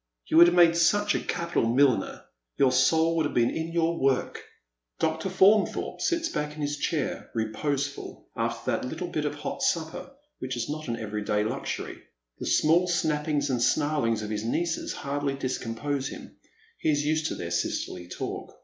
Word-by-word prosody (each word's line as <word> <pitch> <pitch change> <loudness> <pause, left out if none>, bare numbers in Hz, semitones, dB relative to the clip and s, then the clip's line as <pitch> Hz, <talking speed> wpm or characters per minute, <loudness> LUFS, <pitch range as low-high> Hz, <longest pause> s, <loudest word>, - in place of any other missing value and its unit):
" - - -58
You - - +4
would 170 +1 +10
have 175 - +2
made 170 -1 +6
such 205 +5 +3
a - - 0
capital 170 -5 -1
milliner. 125 -4 +2 0.3
Your 135 -2 +4
soul 160 +6 +3
would 160 -2 +2
have - - -9
been 120 -1 +3
in 160 +1 -3
your 170 0 +1
work." 135 -1 0 0.5
Dr. 160 +4 -1
Faunthorpe 195 +3 +3
sits 335 -2 +1
back 150 - -3
in 155 - -7
his 145 0 -2
chair, 150 0 -2
reposeful, 140 +6 -3
after - - -2
that - - -1
little 160 +7 -4
bit 155 -3 -2
of 145 - -2
hot 145 - -5
supper, 160 +6 -1 0.3
which 130 -1 -4
is 115 - -2
not 155 0 -5
an 115 -1 -2
every 105 -1 -4
day 105 0 +1
luxury. 110 - -4 0.4
The - - -4
small 170 +4 +4
snappings 150 -4 0
and 125 -2 0
snarlings 130 -6 +1
of 105 - -5
his 105 0 -2
nieces 165 +8 -1
hardly 140 0 -2
discompose 135 +1 -3
him, - - -10 0.4
he - - 0
is 145 -1 +2
80 145 - -3
used 155 0 +1
to - - -3
their 85 -1 -5
sisterly 85 +1 -2
talk. - - -6
145 Hz, 185 wpm, -27 LUFS, 125-165 Hz, 0.5 s, would